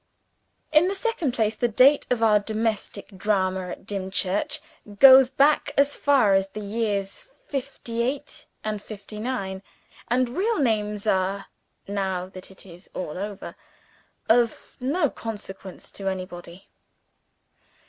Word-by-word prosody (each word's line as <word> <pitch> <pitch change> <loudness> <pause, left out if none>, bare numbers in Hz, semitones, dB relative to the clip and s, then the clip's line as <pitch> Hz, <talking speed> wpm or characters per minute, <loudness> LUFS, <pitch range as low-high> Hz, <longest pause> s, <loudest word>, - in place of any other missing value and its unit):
In 315 +3 +5
the 390 - -1
second 390 - -1
place, 220 -2 +1
the 240 - +1
date 260 +6 +5
of 240 -2 +1
our 210 -2 +5
domestic 215 -1 -3
drama 190 -2 0
at 175 - -8
Dimchurch 195 0 -1 0.4
goes 265 +1 +9
back 285 +3 +2
as 280 +1 +4
far 270 -8 +4
as 195 0 +3
the 205 - -8
years 205 -2 -2 0.2
'fifty 245 - -4
eight 260 +4 -4 0.2
and 215 -1 -3
'fifty 210 0 -9
nine; 200 -5 -3 0.5
and 250 +1 +1
real 410 - 0
names 210 -5 0
are 195 -1 0 0.4
(now 190 -2 -2
that 185 -1 -11
it 190 - -15
is 180 0 -14
all 155 -4 -4
over) 200 +2 -6 0.7
of 230 0 +2
no 295 +6 +1
consequence 200 -6 -8
to 195 - -6
anybody. 185 -1 -6
210 Hz, 130 wpm, -25 LUFS, 195-250 Hz, 0.7 s, goes